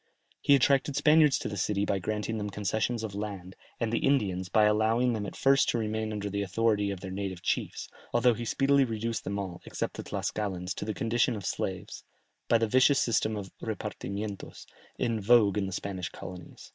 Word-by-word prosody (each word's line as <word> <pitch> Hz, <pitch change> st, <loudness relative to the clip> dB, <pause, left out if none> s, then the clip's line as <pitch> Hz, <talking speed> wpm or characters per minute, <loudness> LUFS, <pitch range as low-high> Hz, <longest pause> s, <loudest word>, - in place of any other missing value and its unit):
He 140 Hz, -, +6 dB
attracted 140 Hz, +1 st, +2 dB
Spaniards 150 Hz, 0 st, +5 dB
to -, -, -4 dB
the 105 Hz, -, -4 dB
city 100 Hz, +1 st, 0 dB
by 100 Hz, -, 0 dB
granting 110 Hz, +4 st, -2 dB
them 105 Hz, 0 st, -3 dB
concessions 110 Hz, +4 st, -1 dB
of 110 Hz, -3 st, -4 dB
lands, 100 Hz, -3 st, -6 dB, 0.2 s
and 115 Hz, -1 st, -1 dB
the -, -, +2 dB
Indians, 95 Hz, -9 st, +1 dB
by 110 Hz, +4 st, +4 dB
allowing 110 Hz, +4 st, +3 dB
them 105 Hz, -2 st, -3 dB
at -, -, -8 dB
first 135 Hz, 0 st, +4 dB
to -, -, +1 dB
remain 110 Hz, -1 st, -2 dB
under 105 Hz, -1 st, -3 dB
the 100 Hz, 0 st, -2 dB
authority 105 Hz, +1 st, +1 dB
of 100 Hz, -2 st, -4 dB
their 95 Hz, -1 st, -6 dB
native 95 Hz, -2 st, -4 dB
chiefs, -, -, -2 dB, 0.2 s
although 120 Hz, 0 st, +4 dB
he 120 Hz, -, -5 dB
speedily 140 Hz, +4 st, +3 dB
reduced 115 Hz, -1 st, -2 dB
them 100 Hz, +2 st, -3 dB
all, 95 Hz, -3 st, -5 dB
except -, -, -4 dB
the -, -, -5 dB
Tlascalans, 95 Hz, -3 st, -3 dB
to -, -, -5 dB
the 110 Hz, -1 st, -3 dB
condition 115 Hz, +3 st, +1 dB
of 100 Hz, -3 st, -6 dB
slaves, -, -, -4 dB, 0.4 s
by 115 Hz, -, +5 dB
the 115 Hz, -, +1 dB
vicious 130 Hz, +5 st, +4 dB
system 110 Hz, -2 st, +1 dB
of 95 Hz, -2 st, -7 dB
repartimientos, 100 Hz, +1 st, -5 dB, 0.3 s
in 115 Hz, -2 st, -1 dB
vogue 105 Hz, -2 st, +5 dB
in 95 Hz, -, -1 dB
the -, -, -5 dB
Spanish 95 Hz, -2 st, -4 dB
colonies. 90 Hz, -2 st, -10 dB
105 Hz, 195 wpm, -29 LUFS, 100-115 Hz, 0.4 s, He